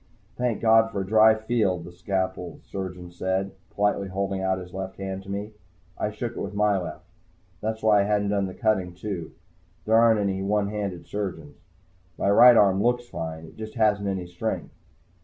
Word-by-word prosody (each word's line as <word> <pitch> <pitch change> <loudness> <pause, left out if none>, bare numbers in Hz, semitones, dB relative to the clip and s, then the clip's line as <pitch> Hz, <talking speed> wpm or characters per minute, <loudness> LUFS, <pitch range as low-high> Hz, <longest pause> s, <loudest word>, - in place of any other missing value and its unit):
"Thank 120 -3 -1
God 115 0 +5
for 100 -3 -3
a - - -3
dry 110 +2 +6
field," 110 -6 0
the 90 - -9
scalpel 95 0 -3
surgeon 90 -2 -6
said, 95 +2 -2 0.2
politely 100 -1 +1
holding 95 0 -2
out 95 0 +1
his 90 -1 -9
left 95 0 -5
hand 95 -1 -4
to 100 - -13
me. 100 +2 -4 0.4
I - - -1
shook 110 +2 -4
it - - -6
with 100 - -5
my 105 0 +3
left. 90 - -7 0.6
That's 110 +1 -3
why 105 -2 +5
I - - +1
hadn't 105 -1 +1
done 100 -1 +1
the 95 - -8
cutting, 95 -6 0
too. 90 -3 -5 0.5
There 110 - 0
aren't 115 -1 +5
any 95 -1 -1
one 100 +1 +1
handed 100 -4 -4
surgeons. 85 -8 -5 0.6
My 100 - +2
right 120 +3 +8
arm 100 -1 +4
looks 120 +1 +1
fine. 80 0 -5
It - - -15
just 110 +1 -7
hasn't 105 -3 +2
any 95 -2 -2
strength. 90 0 -4
100 Hz, 190 wpm, -25 LUFS, 95-110 Hz, 0.6 s, right